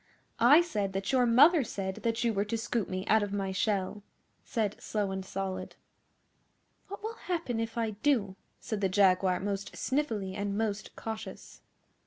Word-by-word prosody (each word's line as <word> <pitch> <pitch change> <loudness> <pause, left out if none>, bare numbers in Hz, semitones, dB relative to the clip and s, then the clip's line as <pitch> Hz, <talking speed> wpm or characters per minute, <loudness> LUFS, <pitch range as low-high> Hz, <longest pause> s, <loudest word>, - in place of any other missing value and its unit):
I 285 +8 +7
said 210 - -2
that 195 +4 -2
your 255 -2 +4
mother 290 +7 +6
said 190 -4 -4
that 230 0 -1
you 230 -1 +2
were 200 -1 +1
to 225 +2 -2
scoop 225 -2 -2
me 185 +1 -3
out 220 +1 +4
of 205 -1 -2
my 195 -1 -2
shell,' 195 +1 -1 0.4
said 215 -3 -2
Slow 205 -3 -1
and 190 0 -3
Solid. 190 -1 -4 1.1
'What 405 +1 -8
will 445 +1 -3
happen 335 - -3
if 225 +1 -3
I 225 -2 0
do?' 215 -3 +1 0.2
said 215 -2 -4
the 195 - +2
Jaguar 185 -1 +3
most 200 0 -3
sniffily 225 -9 -1
and 200 0 -2
most 215 -2 -2
cautious. 220 -1 -7
210 Hz, 170 wpm, -30 LUFS, 195-235 Hz, 1.1 s, I